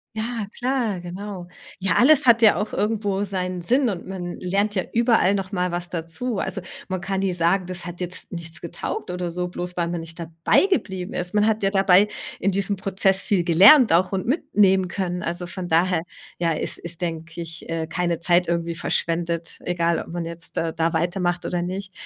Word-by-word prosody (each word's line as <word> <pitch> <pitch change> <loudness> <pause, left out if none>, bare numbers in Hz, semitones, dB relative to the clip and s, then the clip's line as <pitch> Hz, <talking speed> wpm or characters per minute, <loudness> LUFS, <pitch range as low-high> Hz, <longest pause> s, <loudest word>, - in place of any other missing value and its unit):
Ja, 225 0 -3
klar, 245 -7 -1
genau. 180 +1 -7 0.3
Ja, 185 -3 +1
alles 290 +2 +5
hat 230 -1 +6
ja 215 - +7
auch 210 +1 -2
irgendwo 205 -2 -1
seinen 185 -2 -1
Sinn 255 +6 +3
und 185 -4 -5
man 180 -2 -6
lernt 200 +3 0
ja 185 - +1
überall 230 -5 +3
noch 195 -2 -3
mal 180 -2 -1
was 175 0 -4
dazu. 175 +7 -3
Also, 190 0 -3 0.3
man 185 -1 -3
kann 195 +1 -2
nie 195 -2 0
sagen: 175 +2 +2
Das 180 0 -5
hat 175 +1 -8
jetzt 180 +2 -4
nichts 170 -1 -6
getaugt 170 - -5
oder 180 -1 -3
so, 180 +1 -2
bloß 180 0 -6
weil 170 -1 0
man 170 -1 -3
nicht 165 +1 -9
dabei 165 - +2
geblieben 190 - -2
ist. 180 +1 -3
Man 210 +1 +3
hat 220 -1 0
ja 195 - +2
dabei 195 0 +5 0.3
in 200 - +1
diesem 200 +1 0
Prozess 195 0 0
viel 195 -6 +1
gelernt 200 - +7
auch 180 +3 +3
und 190 +1 -2
mitnehmen 195 - +3
können. 180 -2 -3
Also, 175 +1 -3
von 180 0 -6
daher, 170 0 +2 0.3
ja, 170 -1 +1
ist 155 - -2
ist, 170 0 -6
denke 165 -1 -4
ich, 165 0 -9
äh, 165 -1 -3
keine 170 -1 -1
Zeit 175 +1 +3
irgendwie 170 0 -1
verschwendet, 170 0 -1
egal, 170 -1 0
ob - - -7
man 170 0 -4
jetzt, 165 -2 -6
äh, 165 -1 -2
da 165 +1 0
weitermacht 175 +1 0
oder 175 -1 -2
nicht. 190 +2 -5
180 Hz, 200 wpm, -23 LUFS, 170-200 Hz, 0.3 s, ja